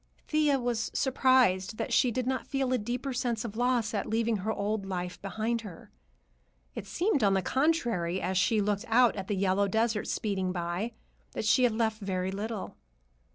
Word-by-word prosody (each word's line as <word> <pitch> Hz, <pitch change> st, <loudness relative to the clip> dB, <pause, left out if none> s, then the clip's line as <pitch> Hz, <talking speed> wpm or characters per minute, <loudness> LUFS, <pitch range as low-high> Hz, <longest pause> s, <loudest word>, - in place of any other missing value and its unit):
Thea 300 Hz, -3 st, +2 dB
was 240 Hz, -3 st, -1 dB
surprised 255 Hz, -7 st, +3 dB
that -, -, -3 dB
she 255 Hz, -, +4 dB
did 250 Hz, +1 st, -2 dB
not 260 Hz, 0 st, -2 dB
feel 270 Hz, -2 st, 0 dB
a 255 Hz, -, +2 dB
deeper 250 Hz, +5 st, -3 dB
sense 240 Hz, -2 st, -1 dB
of 220 Hz, -2 st, -6 dB
loss 240 Hz, -2 st, +1 dB
at 205 Hz, -, -2 dB
leaving 225 Hz, 0 st, +1 dB
her 205 Hz, +3 st, -2 dB
old 210 Hz, 0 st, -2 dB
life 180 Hz, -2 st, -5 dB
behind 220 Hz, +4 st, -2 dB
her. 195 Hz, -7 st, -11 dB, 0.8 s
It -, -, -7 dB
seemed, 345 Hz, -, +1 dB
on 195 Hz, -1 st, +4 dB
the 190 Hz, -, +1 dB
contrary, 240 Hz, -, +1 dB
as 190 Hz, 0 st, -2 dB
she 210 Hz, +3 st, +3 dB
looked 205 Hz, +2 st, -1 dB
out 240 Hz, +1 st, +4 dB
at 195 Hz, -2 st, -5 dB
the 205 Hz, -, -1 dB
yellow 195 Hz, +1 st, +2 dB
desert 220 Hz, +1 st, 0 dB
speeding 190 Hz, -3 st, -1 dB
by, 175 Hz, +6 st, -3 dB, 0.4 s
that -, -, -3 dB
she 255 Hz, +4 st, +4 dB
had 235 Hz, -, +2 dB
left 220 Hz, -1 st, -1 dB
very 190 Hz, -1 st, -2 dB
little. 210 Hz, +1 st, -5 dB
220 Hz, 185 wpm, -29 LUFS, 195-245 Hz, 0.8 s, she